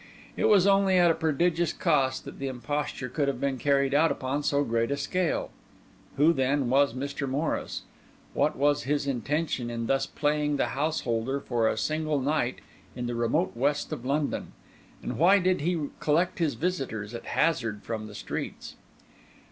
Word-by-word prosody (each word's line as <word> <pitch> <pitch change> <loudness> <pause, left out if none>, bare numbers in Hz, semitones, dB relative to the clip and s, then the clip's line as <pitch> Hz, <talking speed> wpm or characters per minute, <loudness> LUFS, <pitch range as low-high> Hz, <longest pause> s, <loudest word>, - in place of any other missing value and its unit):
It - - 0
was 195 -3 +5
only 195 -1 +4
at 175 -1 +6
a - - +3
prodigious 165 +1 +1
cost 135 -6 +1
that - - -9
the 135 - -3
imposture 135 +1 -3
could 140 +3 -1
have 135 -3 -1
been 135 -1 -1
carried 140 0 +2
out 160 +3 +4
upon 135 +3 -2
so 145 0 +1
great 115 -2 0
a 140 - -1
scale. 175 +4 -1 0.7
Who, 155 +4 +5
then, 135 -2 +1
was 140 -2 +3
Mr. 140 +1 -3
Morris? 145 +5 -2 0.5
What - - +1
was 145 +1 +2
his 145 +1 0
intention 140 -1 -1
in 115 -1 -3
thus 135 +3 +1
playing 150 -1 0
the - - 0
householder 135 -3 -1
for 120 -4 0
a - - 0
single 155 -1 0
night 135 -2 -1 0.3
in 125 - -4
the 120 - -2
remote 120 +9 +1
west 145 +4 0
of - - -6
London? 140 +3 -1 0.5
And - - -4
why 185 +5 +6
did 185 -2 +1
he 170 +2 0 0.2
collect 170 +5 +1
his 160 -4 +1
visitors 135 - -3
at 115 - -7
hazard 115 -11 0
from 110 -2 -4
the 105 - -11
streets? - - -6
140 Hz, 170 wpm, -27 LUFS, 130-160 Hz, 0.7 s, at